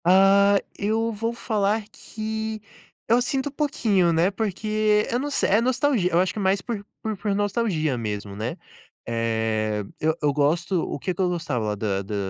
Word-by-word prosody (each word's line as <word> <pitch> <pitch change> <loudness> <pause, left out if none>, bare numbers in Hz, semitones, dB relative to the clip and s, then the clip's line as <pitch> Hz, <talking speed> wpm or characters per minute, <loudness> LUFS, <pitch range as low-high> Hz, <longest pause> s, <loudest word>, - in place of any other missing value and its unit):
Ah, 195 +2 +6 0.2
eu 225 +2 0
vou 225 +2 -2
falar 215 -2 0
que 220 0 -5 0.5
eu 235 +2 +4
sinto 270 +2 -1
um - - -14
pouquinho, 220 - +1
né, 170 +4 +3
porque 215 +1 +1
eu 240 - +1
não 290 +2 -2
se 285 - 0
é 210 +3 +4
nostalgi 250 -5 +2
eu 170 - +2
acho 185 0 +1
que - - -5
mais 195 0 +2
por 210 +1 -5 0.2
por 220 -1 -2
por 205 0 -1
nostalgia 200 - 0
mesmo, 105 -2 -4
né? 110 +4 -4 0.5
Eh, 110 -2 0 0.2
eu 160 +1 +1
eu 145 -2 +2
gosto 165 +5 +1
o - - -3
que 185 - -2
que 175 - -3
eu 180 - +2
gostava 130 -12 -2
da 100 -2 -1
da 100 +2 -5
195 Hz, 180 wpm, -24 LUFS, 150-220 Hz, 0.5 s, Ah